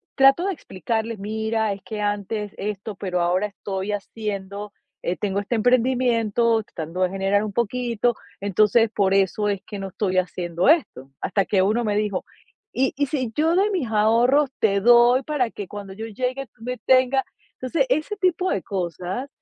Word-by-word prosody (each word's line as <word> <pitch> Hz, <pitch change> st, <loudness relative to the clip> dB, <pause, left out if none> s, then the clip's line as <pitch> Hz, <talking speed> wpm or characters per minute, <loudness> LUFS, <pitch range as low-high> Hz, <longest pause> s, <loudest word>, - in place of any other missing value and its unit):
trato 270 Hz, +6 st, +5 dB
de 395 Hz, -, 0 dB
explicarles, 225 Hz, -, -3 dB
mira, 220 Hz, +1 st, -1 dB
es 195 Hz, -, -10 dB
que 215 Hz, -2 st, -5 dB
antes 205 Hz, 0 st, -2 dB
esto, 205 Hz, +1 st, -4 dB
pero 180 Hz, -2 st, -2 dB
ahora 180 Hz, +4 st, +1 dB
estoy 195 Hz, 0 st, -5 dB
haciendo, 205 Hz, -1 st, -5 dB, 0.3 s
eh, 180 Hz, -, -1 dB
tengo 200 Hz, -1 st, -1 dB
este 205 Hz, +4 st, -2 dB
emprendimiento 235 Hz, -2 st, +2 dB
tratando 165 Hz, 0 st, -6 dB
de 185 Hz, -, +2 dB
generar 195 Hz, +2 st, +1 dB
un 210 Hz, -2 st, -4 dB
poquito, 240 Hz, 0 st, 0 dB, 0.3 s
entonces 210 Hz, +3 st, +3 dB
por 195 Hz, -2 st, +2 dB
eso 195 Hz, +2 st, +2 dB
es 200 Hz, -2 st, -2 dB
que 205 Hz, -, -7 dB
no 195 Hz, 0 st, -5 dB
estoy 185 Hz, -1 st, -1 dB
haciendo 175 Hz, 0 st, -2 dB
esto. 140 Hz, -, +1 dB
Hasta 195 Hz, +1 st, +1 dB
que 195 Hz, -1 st, +2 dB
uno 215 Hz, +5 st, +2 dB
me 210 Hz, -2 st, 0 dB
dijo: 210 Hz, -3 st, -1 dB, 0.5 s
"¿Y 265 Hz, +1 st, +1 dB
y 285 Hz, +1 st, 0 dB
si 255 Hz, -6 st, -2 dB
yo 320 Hz, +3 st, +2 dB
de 400 Hz, +3 st, +3 dB
mis 355 Hz, -11 st, -1 dB
ahorros 235 Hz, +6 st, +3 dB
te 200 Hz, -2 st, +3 dB
doy 240 Hz, +3 st, +6 dB
para 270 Hz, -6 st, 0 dB
que 200 Hz, -3 st, -7 dB
cuando 205 Hz, -2 st, -8 dB
yo 220 Hz, +3 st, -6 dB
llegue 255 Hz, +4 st, -3 dB
tú 225 Hz, -, -19 dB
me 250 Hz, +1 st, -3 dB
tengas?". 260 Hz, +1 st, +4 dB, 0.3 s
Entonces, 270 Hz, +2 st, 0 dB
ese 310 Hz, +10 st, 0 dB
tipo 370 Hz, -1 st, +1 dB
de 195 Hz, -, 0 dB
cosas. 185 Hz, -, -4 dB
215 Hz, 175 wpm, -23 LUFS, 195-250 Hz, 0.5 s, doy